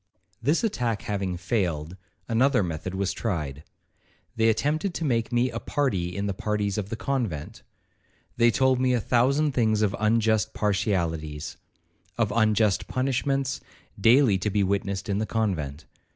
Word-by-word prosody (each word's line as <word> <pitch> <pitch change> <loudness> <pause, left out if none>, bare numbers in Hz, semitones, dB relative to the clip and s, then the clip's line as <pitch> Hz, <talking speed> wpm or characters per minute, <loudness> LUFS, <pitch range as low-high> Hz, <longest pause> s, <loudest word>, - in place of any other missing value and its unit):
'This 145 - +1
attack 120 - -1
having 95 -3 -2
failed, 90 -5 -1 0.3
another 125 0 +3
method 90 +2 -4
was 95 0 -1
tried. 75 - -3 0.7
They 115 0 +3
attempted 155 - 0
to 165 - -2
make 115 -5 0
me 120 +1 +2
a 115 - -4
party 100 - -1
in 100 - -1
the 100 - -1
parties 105 0 -1
of 100 -1 -5
the 115 - -3
convent. 115 - -3 0.7
They 120 0 +5
told 130 +2 +2
me 130 -1 +3
a 125 - +2
thousand 135 +7 +2
things 110 -4 +2
of 100 -2 +1
unjust 110 0 +2
partialities,—of 85 +1 -3
unjust 110 -3 +2
punishments, 135 +1 -1 0.4
daily 115 -1 +5
to 105 - -1
be 100 0 +1
witnessed 100 +1 -1
in 100 -1 0
the 110 - -1
convent. 80 -10 -2
110 Hz, 145 wpm, -26 LUFS, 95-120 Hz, 0.7 s, They